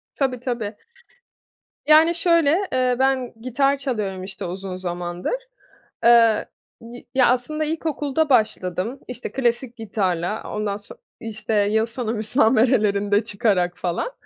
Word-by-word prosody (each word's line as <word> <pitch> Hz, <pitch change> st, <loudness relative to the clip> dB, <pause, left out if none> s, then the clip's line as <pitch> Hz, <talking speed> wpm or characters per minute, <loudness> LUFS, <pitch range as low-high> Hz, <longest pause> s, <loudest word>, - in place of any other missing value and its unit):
Tabii, 260 Hz, -3 st, -1 dB
tabii. 235 Hz, -4 st, -3 dB, 1.1 s
Yani, 315 Hz, +2 st, +6 dB
şöyle, 335 Hz, -3 st, +3 dB, 0.2 s
eee, 255 Hz, -1 st, +2 dB
ben 265 Hz, -2 st, +1 dB
gitar 275 Hz, +3 st, +1 dB
çalıyorum 210 Hz, -9 st, -3 dB
işte 190 Hz, -, -7 dB
uzun 185 Hz, +1 st, -5 dB
zamandır. 175 Hz, -, -4 dB, 0.7 s
Eee, 230 Hz, -2 st, +5 dB, 0.4 s
y 235 Hz, +1 st, -11 dB
ya, 260 Hz, -2 st, +5 dB
aslında 255 Hz, +6 st, 0 dB
ilkokulda 310 Hz, -1 st, -1 dB
başladım, 215 Hz, -1 st, 0 dB
işte, 250 Hz, 0 st, -6 dB
klasik 245 Hz, -1 st, -1 dB
gitarla, 200 Hz, -3 st, -2 dB
o -, -, -7 dB
ondan 210 Hz, -1 st, -2 dB
son 205 Hz, -, -13 dB, 0.2 s
işte, 220 Hz, 0 st, -5 dB
yıl 220 Hz, +2 st, +2 dB
sonu 230 Hz, -1 st, -4 dB
müsamerelerinde 215 Hz, -3 st, +2 dB
çıkarak 185 Hz, -4 st, 0 dB
falan. 175 Hz, -, -2 dB
230 Hz, 120 wpm, -22 LUFS, 205-260 Hz, 1.1 s, Yani